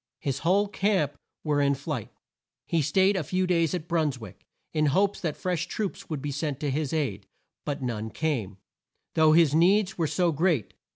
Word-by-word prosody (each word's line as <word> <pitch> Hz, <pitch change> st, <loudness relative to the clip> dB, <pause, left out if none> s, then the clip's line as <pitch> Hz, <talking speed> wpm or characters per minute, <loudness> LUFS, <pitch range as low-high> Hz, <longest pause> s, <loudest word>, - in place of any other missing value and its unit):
His 135 Hz, -2 st, -2 dB
whole 195 Hz, +5 st, +2 dB
camp 190 Hz, -8 st, 0 dB, 0.3 s
were 150 Hz, -2 st, +1 dB
in 140 Hz, 0 st, +3 dB
flight. 140 Hz, -4 st, -4 dB, 0.6 s
He 165 Hz, -, +1 dB
staid 190 Hz, +7 st, +3 dB
a 185 Hz, -, 0 dB
few 185 Hz, +6 st, 0 dB
days 170 Hz, -2 st, +1 dB
at 180 Hz, -, -2 dB
New -, -, -20 dB
Bruns 160 Hz, -6 st, 0 dB
wick, 110 Hz, -6 st, -12 dB, 0.3 s
in 155 Hz, -1 st, +2 dB
hopes 195 Hz, +7 st, +1 dB
that 160 Hz, -5 st, -2 dB
fresh 180 Hz, -3 st, -2 dB
troops 210 Hz, -3 st, -4 dB
would 150 Hz, -4 st, -4 dB
be 145 Hz, -, -2 dB
sent 145 Hz, -1 st, -3 dB
to 145 Hz, -2 st, 0 dB
his 145 Hz, 0 st, -1 dB
aid, 125 Hz, -11 st, -2 dB, 0.4 s
but 145 Hz, -1 st, -3 dB
none 110 Hz, -3 st, -3 dB
came, 115 Hz, -10 st, -2 dB, 0.6 s
though 155 Hz, -1 st, +5 dB
his 160 Hz, -3 st, +5 dB
needs 185 Hz, +4 st, +3 dB
were 165 Hz, -, +2 dB
so 170 Hz, +3 st, +1 dB
great. 155 Hz, -, 0 dB
155 Hz, 190 wpm, -27 LUFS, 140-180 Hz, 0.6 s, though